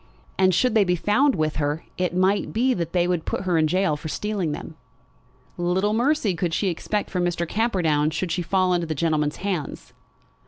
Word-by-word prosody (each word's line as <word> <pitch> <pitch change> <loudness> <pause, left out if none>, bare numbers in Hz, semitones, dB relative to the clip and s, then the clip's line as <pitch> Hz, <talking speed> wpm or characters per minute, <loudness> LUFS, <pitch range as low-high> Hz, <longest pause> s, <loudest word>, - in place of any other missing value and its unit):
And 185 0 +4
should 245 +7 +2
they 220 -3 +5
be 180 -2 +1
found 245 - +2
with 155 -1 -1
her 150 +1 -1
it 180 -1 -1
might 190 +2 +1
be 255 +4 +2
that 170 -5 -3
they 175 0 +2
would 175 -3 0
put - - -3
her 185 -2 0
in 155 - +3
gaol 185 -1 +1
for 150 - -7
stealing 195 -1 -2
them. 150 - -6 0.8
Little 185 +4 +1
mercy 240 -3 +1
could 170 -1 -1
she 200 - +1
expect 205 +4 -3
from 180 -2 0
Mr. 175 -1 -1
Camperdown 170 -9 +1
should 170 +2 -3
she 175 - -1
fall 185 +1 +1
into 175 -1 0
that 155 - -2
gentleman's 150 -1 0
hands! 180 -8 -4
180 Hz, 200 wpm, -24 LUFS, 160-200 Hz, 0.8 s, they